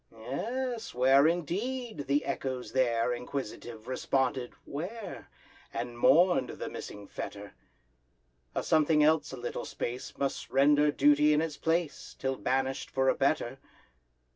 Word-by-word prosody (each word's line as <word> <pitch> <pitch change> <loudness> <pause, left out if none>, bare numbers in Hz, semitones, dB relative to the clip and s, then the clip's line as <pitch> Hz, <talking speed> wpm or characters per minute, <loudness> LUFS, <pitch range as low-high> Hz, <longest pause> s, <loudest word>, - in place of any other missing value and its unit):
Yes! 225 - -4
where 135 +4 +6
indeed? 200 - -2
the 140 +2 +2
echoes 130 -2 -3
there, 120 -2 +2
Inquisitive, 120 -2 -6
responded 130 -1 0
"where?" 190 +7 -6 0.4
And 120 -1 -4
mourn'd 145 +2 +4
the - - -5
missing 105 0 -8
fetter: 100 +1 -7 1.0
A - - 0
something 155 -1 +4
else 150 -1 +3
a 130 - -7
little 120 0 -4
space 125 +2 -5
Must 140 0 -2
render 145 +2 +4
duty 150 +1 +5
in 150 - +3
its 155 -3 -4
place, 165 -1 -1
Till 135 0 -1
banish'd 135 +1 -1
for 135 0 +2
a - - +4
better. 135 -2 0
140 Hz, 130 wpm, -30 LUFS, 125-160 Hz, 1.0 s, where